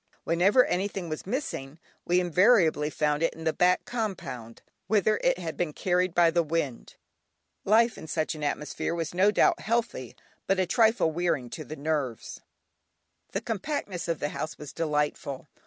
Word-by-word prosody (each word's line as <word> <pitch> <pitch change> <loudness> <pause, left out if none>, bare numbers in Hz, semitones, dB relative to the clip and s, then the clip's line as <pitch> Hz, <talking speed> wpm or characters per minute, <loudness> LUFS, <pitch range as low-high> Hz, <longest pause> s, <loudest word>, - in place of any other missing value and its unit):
Whenever 190 +9 +4
anything 190 -1 -2
was 155 +3 -5
missing 180 - -4 0.3
we 180 +1 +3
invariably 180 -4 +3
found 150 0 0
it 165 - +1
in 160 - -9
the 160 -1 +1
back 180 +1 +2
compound, 175 - -5 0.2
whither 215 0 +3
it - - +3
had - - -5
been 170 -4 -2
carried 180 0 0
by 170 -1 +5
the 170 +1 +3
wind. 155 -6 -3 0.7
Life 225 +3 +3
in 160 - -9
such 155 0 -1
an 155 -1 -7
atmosphere 150 +3 -2
was 165 -1 -3
no 190 +3 +4
doubt 210 - +3
healthy, 225 - -2 0.3
but 195 -1 +2
a 185 - +3
trifle 220 -3 +3
wearing 155 -7 -1
to 155 - -6
the 155 - -8
nerves. 145 -6 -3 0.9
The - - -1
compactness 210 - -3
of 165 -1 0
the 145 - -1
house 155 - -5
was 150 - -9
delightful. 150 -3 -2
170 Hz, 165 wpm, -27 LUFS, 150-195 Hz, 0.9 s, by